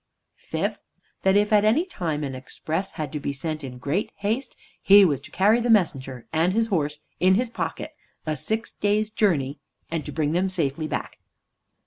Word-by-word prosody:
Fifth, - - -2 0.4
that 190 0 +3
if 210 +1 +3
at 205 -1 +6
any 235 +11 +3
time 160 - -3
an 135 -2 -3
express 160 +8 -4
had 155 -3 -4
to 150 - -2
be 140 - -2
sent 155 +2 -4
in 125 -2 -7
great 145 +11 -1
haste, 220 +7 -2 0.3
he 200 0 +8
was 145 -7 +1
to 140 - -13
carry 210 +5 +3
the 240 - -1
messenger 135 - +1
and 165 +3 +2
his 225 +2 +2
horse 150 -6 0 0.2
in 185 +1 +5
his 235 +2 0
pocket - - -4 0.3
a 155 -1 -1
six 220 +7 -3
days' 210 +1 0
journey, 155 -11 +1 0.3
and 165 -2 -1
to - - -7
bring 150 -2 0
them 180 +3 +1
safely 155 -4 -1
back. - - -4
175 Hz, 185 wpm, -25 LUFS, 150-210 Hz, 0.4 s, he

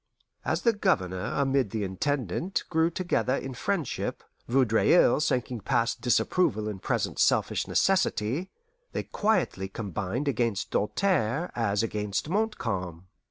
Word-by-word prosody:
As - - -1
the 235 - +4
Governor 95 - 0
amid 135 -4 +1
the 105 +1 -2
Intendant 135 - -1
grew 160 0 +3
together 170 -6 0
in 135 -1 -4
friendship, 160 +4 -2 0.2
Vaudreuil 125 +7 +4
sinking 125 -4 0
past 115 +4 0
disapproval 120 - +1
in 105 -3 -4
present - - -1
selfish - - +2
necessity, 135 - +1 0.4
they - - -2
quietly 205 - 0
combined 110 - -3
against 115 -7 0
Doltaire 150 - 0
as 105 -3 +1
against 105 +3 -2
Montcalm. 95 - -2
120 Hz, 115 wpm, -28 LUFS, 105-160 Hz, 0.4 s, the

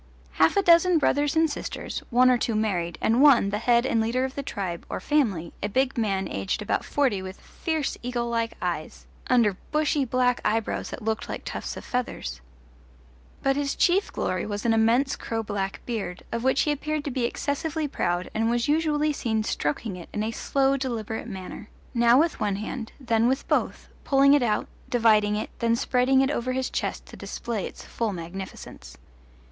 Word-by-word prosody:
Half 160 - +3
a 400 - +4
dozen 345 0 +6
brothers 290 0 +2
and 320 0 +4
sisters, 290 - -5
one 255 +1 +5
or 250 - +4
two 230 - -1
married, 180 -6 -1
and 230 +4 +3
one, 265 -9 +6
the 210 - -1
head 235 +1 +3
and 230 -3 +2
leader 245 +4 +1
of 265 - -5
the 280 - -3
tribe, 190 -10 -4
or - - -3
family, 195 - 0
a 205 - -1
big 265 +4 +1
man 200 -5 0
aged 95 - -2
about - - 0
forty 260 -9 +1
with 190 +1 -8
fierce 315 -4 -3
eagle 240 -1 -2
like 230 -1 -1
eyes - - -4 0.2
under 230 -7 +3
bushy 300 -1 +2
black 250 0 +1
eyebrows 220 +1 -1
that 250 - -7
looked 220 0 -2
like - - -5
tufts - - -5
of - - -9
feathers. 70 - -3 1.0
But 270 0 +3
his 285 0 -1
chief 380 +3 +2
glory 185 -1 -2
was 205 +1 -4
an 230 - +4
immense 230 +5 +3
crow 225 -1 -3
black 200 -2 -3
beard, 205 -7 -4
of 230 0 -2
which 265 +1 +3
he 300 - +1
appeared 300 +1 -2
to 285 - -3
be 245 -1 0
excessively 295 +5 -2
proud 175 -9 -1
and 225 +1 +1
was 240 0 +1
usually 300 0 +2
seen 220 -5 -1
stroking 180 +3 -2
it 175 - -10
in 210 - -2
a 220 - -1
slow 275 +4 +1
deliberate 230 -4 -3
manner, 195 0 -8 0.2
now 235 +1 +5
with 325 +1 +1
one 205 -2 0
hand, 225 +3 -5
then 230 -3 +2
with 265 +2 0
both, - - 0 0.2
pulling 275 0 +5
it 290 - +5
out, 220 -3 +1 0.2
dividing 215 -3 +4
it, 215 - -3
then 230 0 +2
spreading 255 +2 +3
it 270 +1 +2
over 255 -2 -1
his 260 0 -2
chest - - -3
to - - -12
display 225 -5 -4
its - - -11
full 225 -3 -2
magnificence. 180 +2 -8
235 Hz, 190 wpm, -26 LUFS, 210-275 Hz, 1.0 s, dozen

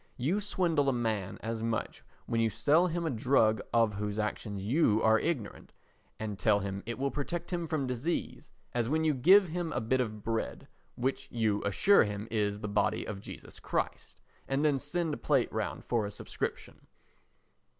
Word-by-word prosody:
You 170 +12 0
swindle 170 -8 +1
a - - +2
man 110 -6 -2
as 115 0 -3
much 115 -1 -3 0.2
when 115 0 0
you 115 - +3
sell 155 - +3
him 170 0 -2
a 160 - 0
drug 110 -3 +3
of 115 -2 +3
whose 105 +1 -3
action 105 -1 -2
you 110 +2 +2
are 110 0 +5
ignorant, 145 -11 -3 0.5
and 105 -3 -4
tell 105 +2 +4
him 100 0 -4
it 120 - -3
will 140 +1 -1
protect 170 +5 -4
him 170 -1 -1
from 155 -4 -1
disease, 130 +7 -3 0.2
as 120 -1 0
when 160 +2 +1
you 155 -1 +3
give 185 +8 +6
him 170 0 -3
a - - -1
bit 130 +3 +1
of 110 -4 -4
bread, 115 0 -3 0.3
which 135 +2 -2
you 110 -3 +1
assure 190 - +5
him 105 0 -4
is 105 -2 0
the 105 - -3
body 105 0 +1
of 100 -2 -6
Jesus - - -10
Christ, - - -3 0.3
and 135 +2 0
then 145 -3 +3
send 160 +3 -1
a - - -3
plate 135 -5 +1
round 110 0 -3
for 115 -4 0
a - - -6
subscription. 105 - -5
120 Hz, 185 wpm, -31 LUFS, 110-155 Hz, 0.5 s, give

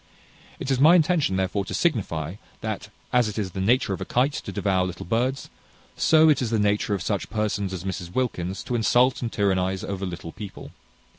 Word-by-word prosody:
It 135 - -3
is 130 - +1
my 155 +5 +7
intention, 160 - +2
therefore, 95 +1 0
to - - -4
signify, 95 - -1 0.2
that, 110 -1 -4 0.2
as 125 -3 +4
it 105 - -7
is 100 -4 -2
the 95 - -4
nature 110 0 +2
of 90 - -5
a - - -3
kite 130 +4 +1
to 100 - -5
devour 95 -1 +1
little 90 -1 -5
birds, 125 +8 -1 0.5
so 160 0 +5
is 145 -4 +3
it - - +1
the 115 - +1
nature 105 0 +1
of 95 - -4
such 100 -1 -2
persons 105 -3 -1
as 90 -2 -5
Mrs 90 -2 -5
Wilkins 95 -7 -2
to - - -4
insult 120 +2 +3
and 115 -2 -3
tyrannize 95 -2 0
over 100 -1 -4
little 85 -2 -7
people. 105 +1 -9
105 Hz, 205 wpm, -25 LUFS, 95-125 Hz, 0.5 s, my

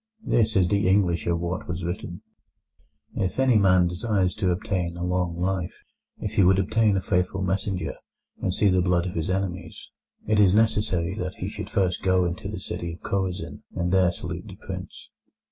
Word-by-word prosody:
This 110 -2 +2
is 95 -3 +4
the 100 +1 +1
English 95 -3 +2
of 85 -1 +1
what 85 +1 -3
was 90 0 -4
written: 85 0 -5 0.9
"If 95 - -2
any 130 -2 +4
man 95 -3 +5
desires 95 0 0
to 100 -4 0
obtain 90 -2 -1
a 85 - -4
long 90 -1 -1
life, 90 -1 -1 0.4
if 105 - -4
he 100 - +4
would 95 +1 +5
obtain 105 +1 +2
a - - 0
faithful 90 +1 0
messenger 95 0 -1 0.5
and 95 - 0
see 100 +2 +3
the 90 -1 +3
blood 90 -1 +2
of 90 - -4
his 80 0 -2
enemies, 95 -1 -4 0.3
it 105 0 +2
is 100 -2 +5
necessary 105 -6 +2
that 90 0 -3
he - - -4
should - - -6
first 95 -2 0
go 95 -1 +3
into 85 0 -4
the - - -5
city 85 -1 -4
of 85 - -12
Chorazin, 95 -1 -3
and 90 +1 -1
there 95 -2 +4
salute - - -6
the - - -9
prince…." - - -8
95 Hz, 190 wpm, -25 LUFS, 90-100 Hz, 0.9 s, man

